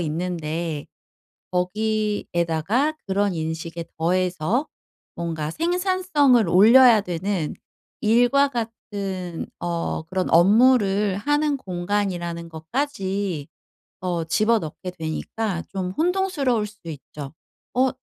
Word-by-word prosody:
있는데 165 -2 -3 0.6
거기에다가 210 - 0
그런 200 -1 +1
인식에 165 +1 -4
더해서 185 - +1 0.5
뭔가 160 -3 -3
생산성을 340 - +2
올려야 225 +4 +7
되는 180 -2 -2 0.5
일과 245 +6 +4
같은 200 -7 -5
어 170 -1 -2
그런 185 +2 -2
업무를 205 +1 +4
하는 290 +4 +1
공간이라는 175 -4 -2
것까지 190 - -3 0.5
어 175 -2 -1
집어넣게 200 -2 0
되니까 175 +3 -3
좀 185 -2 -3
혼동스러울 310 - +1
수도 205 -5 -12
있죠. 145 -1 -8 0.4
어 260 +1 +4
195 Hz, 220 characters per minute, -23 LUFS, 170-235 Hz, 0.6 s, 올려야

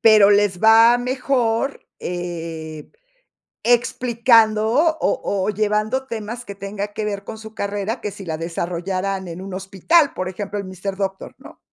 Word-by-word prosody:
pero 215 -2 +7
les 205 -2 +2
va 225 +2 +7
mejor, 250 0 -1
eh, 165 -3 -6 0.7
explicando 230 -2 +3 0.3
o 200 - 0
o - - -1
llevando 215 +5 0
temas 230 +2 -5
que 200 - -8
tenga 200 +1 -4
que 215 - -3
ver 200 -1 -3
con 220 - -7
su 220 0 -11
carrera, 205 +3 -3
que 210 - -3
si 195 -1 -10
la 160 -1 -2
desarrollaran 180 +3 -3
en 170 +2 -7
un 195 -1 -7
hospital, 195 - +2
por 185 0 -3
ejemplo, 205 +2 -5
el 200 - -4
Mister 185 +1 -5
Doctor, 195 -1 -4
¿no? - - -14
205 Hz, 155 wpm, -21 LUFS, 190-225 Hz, 0.7 s, pero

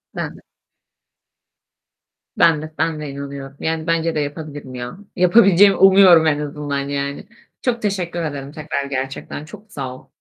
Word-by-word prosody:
Ben - - -4
de. - - -17 1.9
Ben 155 -3 +4
de, 155 - -6
ben 160 -1 0
de 150 - -5
inanıyorum. 140 0 -8
Yani, 160 0 -2
bence 165 0 0
de 150 - +1
yapabilirim 145 -3 -6
ya. 125 +8 -6 0.2
Yapabileceğimi 195 +1 +6
umuyorum 190 -4 +7
en 150 -1 +2
azından 145 -1 -3
yani. 140 0 -4 0.3
Çok 240 -2 -1
teşekkür 180 -4 -2
ederim 140 -3 -5
tekrar, 150 -2 -4
gerçekten 135 +2 -5
çok 210 +6 -14
sağ 130 -7 -5
ol. - - -16
155 Hz, 145 wpm, -20 LUFS, 140-175 Hz, 1.9 s, umuyorum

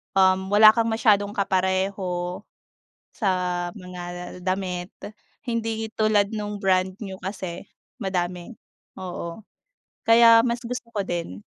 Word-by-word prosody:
um, 190 0 +4
wala 210 +2 +8
kang 230 +1 0
masyadong 210 -3 +2
kapareho 190 -2 -1 0.7
sa 205 - -1 0.4
mga 180 -1 -8
damit 185 -1 -2 0.5
hindi 225 -3 -2
tulad 215 -2 +3
nung 210 -2 -5
brand 185 -1 +2
new 190 -3 -6
kasi 185 -2 -6 0.3
madami 180 -2 -3 0.5
oo, 175 +1 -6 0.6
kaya 230 0 +7
mas 235 -1 -1
gusto 240 0 -6
ko 210 - -2
din. 170 - -4
195 Hz, 110 wpm, -24 LUFS, 180-220 Hz, 0.7 s, wala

